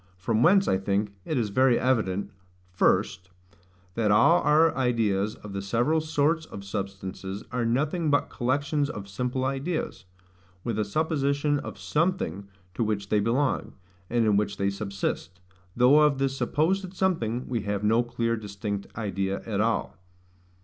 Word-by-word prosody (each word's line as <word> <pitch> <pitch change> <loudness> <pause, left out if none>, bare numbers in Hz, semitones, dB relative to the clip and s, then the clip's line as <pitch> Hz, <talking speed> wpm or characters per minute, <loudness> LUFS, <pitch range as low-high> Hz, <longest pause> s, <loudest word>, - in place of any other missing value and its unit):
From 110 +5 0
whence, 195 +7 +5
I 95 - +2
think, 100 +1 -1
it 155 - -1
is 115 -4 0
very 130 +4 +4
evident, 110 -7 0 0.4
First, 95 +1 +1 0.6
That 110 0 0
all 115 +12 +5
our 155 +2 +4
ideas 110 -5 +1
of 105 -1 -10
the 100 - -3
several 120 +11 +1
SORTS 155 +1 0
of 100 - -9
substances 100 0 -5
are 125 -2 -1
nothing 150 +7 0
but 145 -1 +2
collections 140 +3 0
of 100 -7 -6
simple 125 +6 -2
ideas: 135 - -3 0.6
with 115 -2 -2
a 105 - +1
supposition 145 +2 0
of - - -7
SOMETHING 150 - -1 0.3
to 115 - -1
which 105 -2 -2
they 105 - +3
belong, 120 +5 0 0.4
and 120 -1 +2
in 105 -2 +3
which 100 -1 -1
they 100 0 0
subsist; 100 -2 -4 0.4
though 125 +5 +6
of 150 -2 +4
this 135 0 0
supposed 185 +7 0
something 130 - 0
we 120 -3 -1
have 100 0 -2
no 110 +3 +4
clear 120 -1 -1
distinct 100 -1 -5
idea 100 -3 -2
at 105 -3 -1
all. 110 -3 -1
115 Hz, 155 wpm, -26 LUFS, 100-145 Hz, 0.6 s, though